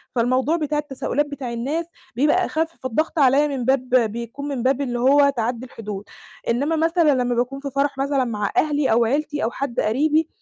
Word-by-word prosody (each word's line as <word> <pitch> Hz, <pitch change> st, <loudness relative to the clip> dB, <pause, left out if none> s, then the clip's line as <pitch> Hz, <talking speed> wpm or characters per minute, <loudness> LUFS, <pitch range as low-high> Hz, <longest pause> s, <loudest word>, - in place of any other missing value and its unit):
فالموضوع 255 Hz, +6 st, +2 dB
بتاع 300 Hz, -2 st, -1 dB
التساؤلات 290 Hz, 0 st, -1 dB
بتاع 275 Hz, -4 st, -6 dB
الناس 290 Hz, +8 st, -2 dB, 0.3 s
بيبقى 300 Hz, +8 st, +3 dB
أخف، 325 Hz, +1 st, -2 dB
فالضغط 310 Hz, +6 st, -1 dB
عليَّ 280 Hz, +2 st, +4 dB
من 265 Hz, -4 st, -3 dB
باب 260 Hz, -1 st, +1 dB
بيكون 235 Hz, +4 st, -1 dB
من 265 Hz, -4 st, -3 dB
باب 270 Hz, +1 st, +2 dB
اللي 245 Hz, -3 st, -2 dB
هو 280 Hz, +3 st, +5 dB
تَعَدّي 240 Hz, -1 st, -2 dB
الحدود. 210 Hz, -4 st, -7 dB, 0.5 s
إنّما 285 Hz, +7 st, +1 dB
مثلًا 325 Hz, -1 st, +3 dB
لمّا 245 Hz, 0 st, -1 dB
باكون 250 Hz, +3 st, -1 dB
في 280 Hz, 0 st, -5 dB
فرح 280 Hz, 0 st, 0 dB
مثلًا 275 Hz, -1 st, +1 dB
مع 210 Hz, -3 st, -2 dB
أهلي 295 Hz, -4 st, +2 dB
أو 230 Hz, +1 st, +4 dB
عيلتي 295 Hz, +3 st, -1 dB
أو 230 Hz, -, 0 dB
حد 270 Hz, -3 st, -3 dB
قريبي، 300 Hz, +8 st, +2 dB
275 Hz, 185 wpm, -22 LUFS, 240-295 Hz, 0.5 s, هو